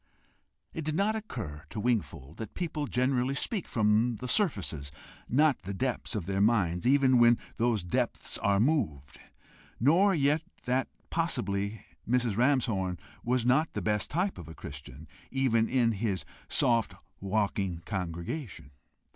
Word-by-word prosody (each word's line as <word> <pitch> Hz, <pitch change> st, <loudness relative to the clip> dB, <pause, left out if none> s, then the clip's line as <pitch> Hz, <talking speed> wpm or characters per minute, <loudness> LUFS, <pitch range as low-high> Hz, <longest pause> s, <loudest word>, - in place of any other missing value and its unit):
It 160 Hz, -, -4 dB
did 155 Hz, 0 st, -2 dB
not 205 Hz, +5 st, +2 dB
occur 110 Hz, -, -6 dB
to -, -, -5 dB
Wingfold 105 Hz, -, -2 dB
that 110 Hz, -2 st, -7 dB
people 155 Hz, -4 st, -2 dB
generally 130 Hz, +1 st, +1 dB
speak 200 Hz, +5 st, -1 dB
from 110 Hz, +2 st, +2 dB
the 125 Hz, +4 st, -6 dB
surfaces, 95 Hz, -, 0 dB, 0.4 s
not 145 Hz, +1 st, +3 dB
the 100 Hz, +2 st, -5 dB
depths 125 Hz, +1 st, -2 dB
of 100 Hz, -6 st, -2 dB
their 95 Hz, +1 st, 0 dB
minds, 95 Hz, -4 st, +2 dB
even 130 Hz, -2 st, +5 dB
when 120 Hz, 0 st, +6 dB, 0.2 s
those 115 Hz, -4 st, +1 dB
depths 90 Hz, -, 0 dB
are 100 Hz, -1 st, +2 dB
moved; 100 Hz, -, 0 dB, 0.6 s
nor 180 Hz, -, +4 dB
yet 145 Hz, +1 st, +2 dB, 0.2 s
that 130 Hz, +2 st, +1 dB, 0.2 s
possibly 100 Hz, -, -1 dB, 0.2 s
Mrs. 120 Hz, -4 st, +2 dB
Ramshorn 115 Hz, -8 st, +1 dB, 0.3 s
was 125 Hz, 0 st, +1 dB
not 135 Hz, +6 st, +3 dB
the -, -, -3 dB
best 105 Hz, -2 st, 0 dB
type 180 Hz, +5 st, -1 dB
of -, -, -9 dB
a 80 Hz, -, -10 dB
Christian, 70 Hz, +2 st, -10 dB, 0.2 s
even 120 Hz, -4 st, +2 dB
in 120 Hz, -3 st, +3 dB
his 100 Hz, -3 st, -2 dB, 0.2 s
soft 115 Hz, -2 st, +2 dB, 0.2 s
walking 100 Hz, -3 st, -1 dB
congregation! 90 Hz, -, -5 dB
115 Hz, 140 wpm, -29 LUFS, 95-135 Hz, 0.6 s, when